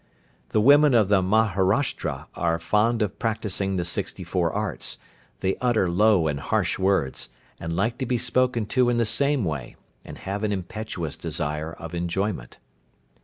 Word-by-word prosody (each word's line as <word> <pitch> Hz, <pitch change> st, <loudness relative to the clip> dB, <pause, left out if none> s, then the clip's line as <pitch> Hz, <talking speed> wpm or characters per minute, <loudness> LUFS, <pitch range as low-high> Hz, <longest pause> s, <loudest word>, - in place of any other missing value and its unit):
The -, -, +2 dB
women 145 Hz, +2 st, +6 dB
of 105 Hz, -4 st, +4 dB
the 100 Hz, -2 st, +4 dB
Maharashtra 95 Hz, -, +1 dB
are 85 Hz, -1 st, 0 dB
fond 110 Hz, +6 st, +2 dB
of 105 Hz, -, -4 dB
practising 100 Hz, -3 st, -1 dB
the 90 Hz, -2 st, -1 dB
sixty 85 Hz, -, -3 dB
four -, -, 0 dB
arts, -, -, -2 dB, 0.4 s
they 95 Hz, 0 st, 0 dB
utter 120 Hz, -6 st, +2 dB
low 100 Hz, -2 st, +4 dB
and 70 Hz, -2 st, -1 dB
harsh -, -, 0 dB
words, 95 Hz, -8 st, 0 dB, 0.3 s
and 85 Hz, 0 st, -4 dB
like 115 Hz, +7 st, 0 dB
to 130 Hz, -, -2 dB
be 125 Hz, -, +1 dB
spoken 125 Hz, -1 st, +1 dB
to 125 Hz, -1 st, +4 dB
in 120 Hz, -, +1 dB
the 115 Hz, -, +2 dB
same 140 Hz, +2 st, +2 dB
way, 75 Hz, -7 st, -4 dB, 0.3 s
and -, -, -10 dB
have 100 Hz, +2 st, -4 dB
an 105 Hz, -, 0 dB
impetuous 95 Hz, -3 st, -4 dB
desire 75 Hz, +2 st, -3 dB
of 85 Hz, +1 st, -9 dB
enjoyment. 85 Hz, -, -2 dB
100 Hz, 165 wpm, -25 LUFS, 85-115 Hz, 0.4 s, women